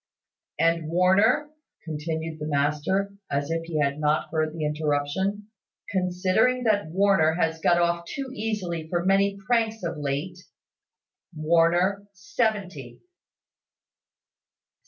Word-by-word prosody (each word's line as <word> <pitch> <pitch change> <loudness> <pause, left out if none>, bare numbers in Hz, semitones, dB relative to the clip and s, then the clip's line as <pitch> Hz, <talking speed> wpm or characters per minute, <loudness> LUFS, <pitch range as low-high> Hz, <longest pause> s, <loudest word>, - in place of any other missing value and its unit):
"And 165 -1 +1
Warner," 200 - +3 0.3
continued 160 0 -4
the 150 - -4
master, 150 +7 0 0.2
as 140 +2 -2
if 165 0 -2
he 165 -2 -4
had 140 0 0
not 150 0 0
heard 155 -1 0
the 155 -1 -4
interruption, 155 +7 -1 0.4
"considering 190 +7 +1
that 210 -5 +1
Warner 190 -3 +3
has 160 -2 0
got 175 - +4
off 170 0 +1
too 270 -1 -5
easily 185 -8 -3
for 175 0 -1
many 195 +1 +2
pranks 225 -2 0
of 170 -2 -3
late, 145 +5 -3 1.0
Warner 170 +5 +2
seventy." 185 - -3
170 Hz, 115 wpm, -25 LUFS, 155-200 Hz, 1.0 s, got